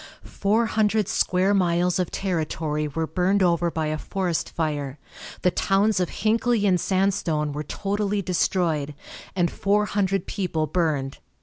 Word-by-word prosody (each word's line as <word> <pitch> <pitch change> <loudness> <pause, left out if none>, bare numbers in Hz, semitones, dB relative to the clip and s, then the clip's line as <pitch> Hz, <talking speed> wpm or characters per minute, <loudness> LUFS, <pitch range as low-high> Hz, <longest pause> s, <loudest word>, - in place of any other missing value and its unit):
Four 215 +4 +1
hundred 215 -2 +1
square 185 +2 +2
miles 180 -1 +2
of 180 - 0
territory 155 -4 -2
were 160 +3 -2
burned 185 +5 +1
over 170 -1 +2
by 160 -1 -2
a 155 0 -2
forest 180 -2 -2
fire, 145 -4 -3 0.5
the 180 - +4
towns 195 +3 +2
of 180 - 0
Hinckley 225 0 +1
and 185 -3 +3
Sandstone 185 -6 0
were 150 - -3
totally 200 +5 -2
destroyed, 165 -5 0 0.4
and 175 -2 +1
four 205 +1 +1
hundred 195 -2 0
people 170 -6 -1
burned. 150 -4 -1
180 Hz, 140 wpm, -24 LUFS, 160-200 Hz, 0.5 s, the